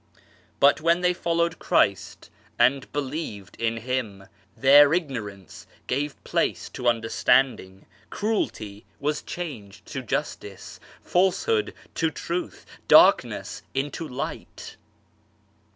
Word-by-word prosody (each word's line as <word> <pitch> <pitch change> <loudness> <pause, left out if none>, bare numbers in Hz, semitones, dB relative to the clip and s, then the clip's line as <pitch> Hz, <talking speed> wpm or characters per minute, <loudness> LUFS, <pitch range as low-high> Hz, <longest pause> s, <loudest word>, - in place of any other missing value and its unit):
But 140 +2 +5
when 170 +2 +2
they 180 0 +3
followed 170 -1 -1
Christ 100 -2 0 0.3
and 130 +3 +2
believed 135 - -5
in 115 0 0
Him, 115 -5 -4 0.3
their 145 +3 +7
ignorance 110 - -5 0.2
gave 145 +2 -3
place - - -1
to 125 - -4
understanding, 115 -3 +1 0.2
cruelty 110 - -3 0.2
was 150 +1 -1
changed 125 - -8
to - - -3
justice, - - -5 0.2
falsehood 195 - +1 0.2
to 165 - 0
truth, 170 +2 -5 0.2
darkness - - +4
into 145 +4 -3
light. 130 0 -7
140 Hz, 100 wpm, -25 LUFS, 115-165 Hz, 0.3 s, their